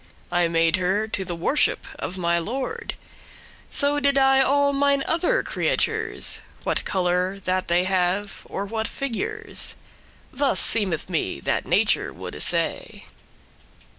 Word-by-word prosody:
I 175 -1 +2
made 165 +1 +2
her 190 +4 0
to 205 -3 -3
the 175 -2 -5
worship* 270 - 0
of 190 - -4
my 170 -1 +1
lord; 250 +10 -4 0.7
So 285 0 +2
do 280 -1 +3
I 270 0 +5
all 280 +1 +2
mine 280 0 +2
other 355 +10 +2
creatures, 445 -1 +1 0.2
What - - -1
colour 180 +1 0
that 185 0 -1
they 175 +1 +2
have, 190 +2 0
or 200 - -3
what 220 +2 -3
figures." 430 - -1 0.6
Thus 275 0 +1
seemeth 195 -8 +2
me 160 - -2
that - - -1
Nature - - +2
woulde - - -8
say. - - 0
205 Hz, 135 wpm, -23 LUFS, 180-280 Hz, 0.7 s, I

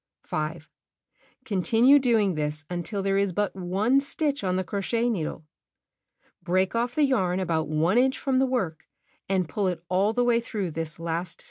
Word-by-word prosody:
5. 155 +1 -4 0.8
Continue 235 +6 +4
doing 225 -7 +2
this 150 0 -3
until 180 +3 -3
there 195 0 +1
is 200 -1 +1
but 205 +3 -1
one 195 +8 +1
stitch 285 -1 -1
on 185 -1 0
the 185 - 0
crochet 230 +6 -1
needle. 160 -5 -3 1.0
Break 185 +2 +1
off 240 +1 -1
the 300 - +4
yarn 190 -9 +1
about 165 -4 -1
1 160 +8 +2
inch 260 +1 +2
from 265 -2 0
the 265 - +3
work, 195 -12 -2 0.4
and 185 -3 +1
pull 200 +3 -1
it 175 -2 -3
all 190 +4 +2
the 245 +2 +1
way 240 -1 +3
through 205 -6 -4
this 160 0 -5
last 165 +1 -2
stitch. - - -20
195 Hz, 175 wpm, -26 LUFS, 170-235 Hz, 1.0 s, Continue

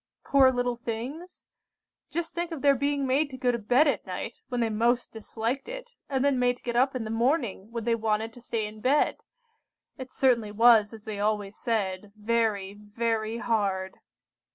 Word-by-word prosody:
Poor 270 -2 +5
little 245 -1 -1
things! 245 +10 -6 0.6
Just 335 +1 -3
think 345 0 -3
of 315 -4 -6
their 280 -1 +6
being 280 +1 0
made 280 +3 +2
to 260 - -8
go 250 -1 +2
to 235 - -2
bed 250 +8 +4
at 265 -8 0
night, 195 +5 -5 0.2
when 245 -1 -2
they 230 -1 +1
most 235 +3 +1
disliked 225 - -3
it, - - -7 0.2
and 270 -1 +1
then 280 -3 +2
made 245 0 +2
to - - -28
get 240 -1 -3
up 260 +2 +3
in 250 - -2
the 220 - -5
morning, 230 -4 0
when 230 -1 -4
they 235 +1 +1
wanted 220 0 -1
to 245 - -14
stay 230 -2 -2
in 215 0 -9
bed! 275 +5 +2 0.8
It 260 0 -7
certainly 240 -6 +2
was, 220 -1 +5
as 220 -2 -11
they 210 -2 -5
always 210 -1 -1
said, 200 -3 -2
'very, 215 -3 0
very 220 +1 -2
hard. 200 -5 -1
235 Hz, 190 wpm, -27 LUFS, 215-260 Hz, 0.8 s, their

